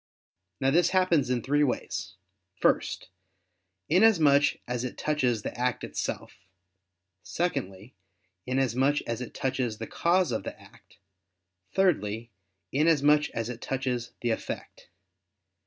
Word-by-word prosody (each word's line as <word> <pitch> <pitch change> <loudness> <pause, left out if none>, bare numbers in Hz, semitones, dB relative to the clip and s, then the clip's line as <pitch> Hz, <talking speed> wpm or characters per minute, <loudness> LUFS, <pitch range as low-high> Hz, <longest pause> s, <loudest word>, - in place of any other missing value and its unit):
Now 135 0 +2
this 175 +4 +4
happens 170 -8 +3
in 125 -3 0
three 145 +2 +2
ways: 105 -7 -2 0.4
first, 95 - 0 0.8
inasmuch 160 -7 +4
as 125 0 -2
it 125 - -5
touches 125 -8 0
the - - -5
act 125 0 -1
itself; - - -4 0.8
secondly, 125 - -3 0.5
inasmuch 130 +2 +1
as 115 +1 -4
it 125 - -7
touches 130 -4 -1
the 115 - -5
cause 175 +5 +1
of 110 - -1
the - - -8
act; - - -19 0.8
thirdly, 120 - +1 0.4
inasmuch 150 0 +3
as 115 -1 -3
it 120 -1 -7
touches 125 -3 -3
the 120 - 0
effect. 110 - -6
130 Hz, 120 wpm, -28 LUFS, 120-150 Hz, 0.8 s, this